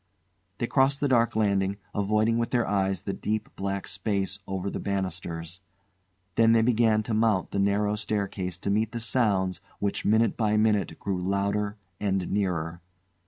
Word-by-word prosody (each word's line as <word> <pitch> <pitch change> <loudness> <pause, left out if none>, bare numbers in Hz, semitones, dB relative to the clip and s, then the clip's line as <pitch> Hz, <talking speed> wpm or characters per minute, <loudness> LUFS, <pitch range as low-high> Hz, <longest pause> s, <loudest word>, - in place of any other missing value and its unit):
They 120 - -1
crossed 135 +2 +2
the 145 - +1
dark 120 -4 +3
landing, 100 -2 +1 0.2
avoiding 105 +3 +2
with 115 - 0
their 120 -2 +1
eyes 95 -2 0
the 100 - -3
deep 110 +2 -2
black 100 0 -3
space 95 0 -1
over 95 0 -3
the - - -3
banisters. 90 -2 -4 0.7
Then 115 +2 +5
they 115 -1 +4
began 110 -2 +3
to 110 - -3
mount 110 -3 +2
the 100 - -1
narrow 100 +1 +2
staircase 100 -4 -3
to 100 - -2
meet 110 +2 +1
the 120 - -2
sounds 100 -6 +1 0.2
which, 100 -1 -2
minute 110 +2 +3
by 105 -2 +1
minute, 105 -6 +2
grew 95 -2 -2
louder 100 +2 0 0.2
and 95 -3 -1
nearer. 85 -4 -1
100 Hz, 165 wpm, -27 LUFS, 95-110 Hz, 0.7 s, Then